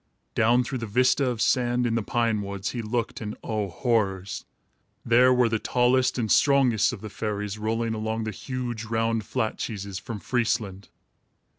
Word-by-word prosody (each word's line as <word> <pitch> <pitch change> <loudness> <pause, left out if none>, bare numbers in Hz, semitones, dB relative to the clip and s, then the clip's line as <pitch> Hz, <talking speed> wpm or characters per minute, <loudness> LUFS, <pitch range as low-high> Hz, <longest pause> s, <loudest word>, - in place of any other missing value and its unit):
Down 120 +3 +3
through 125 +1 -4
the 115 - -4
vista 125 +4 +3
of 120 -3 -1
sand, 125 -1 +2
in 115 - 0
the 115 - +1
pine 115 -1 0
woods, 100 -1 -4
he 120 - -3
looked, 115 +2 -3
and 105 -1 -5
oh, 105 -3 -2
horrors! 100 -2 -1 0.6
There 125 +2 +5
were 125 -1 +4
the 110 -1 0
tallest 125 +2 +2
and 110 -4 -1
strongest 135 -7 +4
of - - -8
the 110 - -6
fairies 105 -1 -3
rolling 115 +1 -1
along 110 +1 -2
the 110 - -3
huge, 120 0 -5
round, 115 0 0
flat 115 -4 -2
cheeses 100 -3 -4
from 110 -1 -6
Friesland! 110 -5 -1
115 Hz, 170 wpm, -26 LUFS, 105-125 Hz, 0.6 s, There